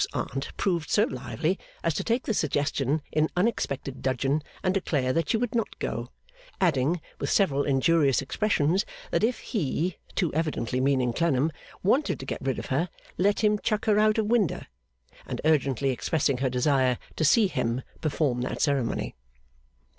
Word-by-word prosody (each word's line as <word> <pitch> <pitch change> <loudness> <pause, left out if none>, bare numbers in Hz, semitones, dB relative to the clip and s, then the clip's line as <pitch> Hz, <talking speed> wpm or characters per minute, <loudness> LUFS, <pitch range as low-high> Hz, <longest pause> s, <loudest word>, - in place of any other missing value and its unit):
's - - +2
Aunt 135 +3 -3
proved 170 -5 0
so 210 - +4
lively 130 - -2 0.2
as 165 - +1
to - - -2
take 235 +2 0
the 225 - -1
suggestion 145 - 0
in 155 0 +2
unexpected 140 - -1
dudgeon 135 +3 0 0.2
and 185 - +2
declare 145 -9 0
that 165 - 0
she 225 - +3
would 240 0 -2
not 230 -3 -1
go; - - -3 0.5
adding, 165 -1 +2 0.2
with - - -2
several 145 -9 +3
injurious 140 0 +3
expressions, 180 +3 +1 0.3
that - - +1
if 240 +2 +2
'He' 175 - -2 0.2
too 175 -5 0
evidently 150 -6 -1
meaning 130 -3 +2
Clennam 155 0 +1 0.3
wanted 265 +10 +2
to 135 - -6
get - - -4
rid 135 -1 -1
of - - -5
her, 165 +7 0 0.3
'let 200 +4 +2
him 210 0 +3
chuck 215 0 -1
her 210 -1 +4
out 215 0 +4
of 220 - +2
winder;' 215 - +1 0.6
and - - -4
urgently 140 -4 +2
expressing 140 +1 0
her 130 -1 +1
desire 130 0 +2 0.2
to - - -1
see 210 +9 +5
'Him' 125 -9 -1 0.2
perform 145 -5 0
that 125 - -3
ceremony. 140 -5 0
155 Hz, 170 wpm, -27 LUFS, 135-195 Hz, 0.6 s, see